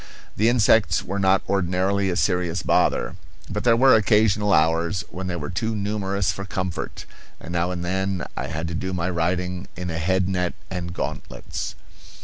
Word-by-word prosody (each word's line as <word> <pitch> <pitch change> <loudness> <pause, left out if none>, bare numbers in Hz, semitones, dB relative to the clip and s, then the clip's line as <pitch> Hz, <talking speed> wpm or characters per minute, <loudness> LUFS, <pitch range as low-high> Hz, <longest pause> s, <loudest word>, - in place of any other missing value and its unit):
The 110 +3 +3
insects 115 -2 +4
were 100 +2 -3
not 95 0 +3
ordinarily 95 +1 +1
a 90 - -1
serious 90 +1 0
bother, - - +1 0.3
but - - -3
there 115 -2 +5
were 130 +2 +6
occasional 105 -1 +3
hours 80 +2 +2
when 90 +1 -5
they 90 - -2
were 75 0 -4
too 110 +5 -1
numerous 100 -2 -1
for 100 +4 -6
comfort, 95 -2 -4 0.3
and 85 - -8
now 85 +1 +1
and 90 -1 -3
then 95 0 -1
I - - -3
had 80 +2 -3
to - - -4
do 95 +2 -3
my 90 0 -1
writing 90 +1 -1
in 90 -1 -4
a 80 - -3
head 95 +2 +1
net 90 -2 -1 0.2
and 90 -2 -4
gauntlets. 75 -4 -5
95 Hz, 175 wpm, -24 LUFS, 85-100 Hz, 0.3 s, were